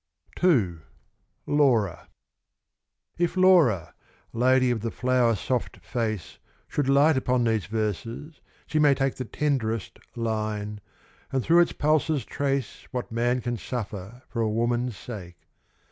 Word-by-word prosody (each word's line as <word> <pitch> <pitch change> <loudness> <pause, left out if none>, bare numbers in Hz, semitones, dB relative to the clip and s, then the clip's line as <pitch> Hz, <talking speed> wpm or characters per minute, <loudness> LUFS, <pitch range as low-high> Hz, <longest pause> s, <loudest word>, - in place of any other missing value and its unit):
II 115 - +3 0.7
Laura 120 - +2 1.1
If 175 +1 0
Laura 165 - +4 0.4
lady 130 +1 +3
of 115 -3 -1
the 115 - -2
flower 125 -1 +2
soft 125 +4 -2
face 110 -7 -3 0.3
Should 140 -2 -1
light 140 +2 +5
upon 125 -1 +1
these 110 -3 0
verses, 115 - -4 0.2
she 155 - -1
may 145 -2 +5
take 135 0 0
The 130 - -4
tenderest 115 -7 -2 0.2
line, 105 -2 -3 0.5
and 130 -2 0
through 170 +2 +5
its 175 - +3
pulses 155 -1 +1
trace 135 -5 -2
What 125 -2 -4
man 120 +2 +1
can 120 -1 -2
suffer 110 0 -6
for 115 - -3
a 110 - +1
woman's 120 +1 0
sake. 90 -8 -8
120 Hz, 130 wpm, -26 LUFS, 110-140 Hz, 1.1 s, light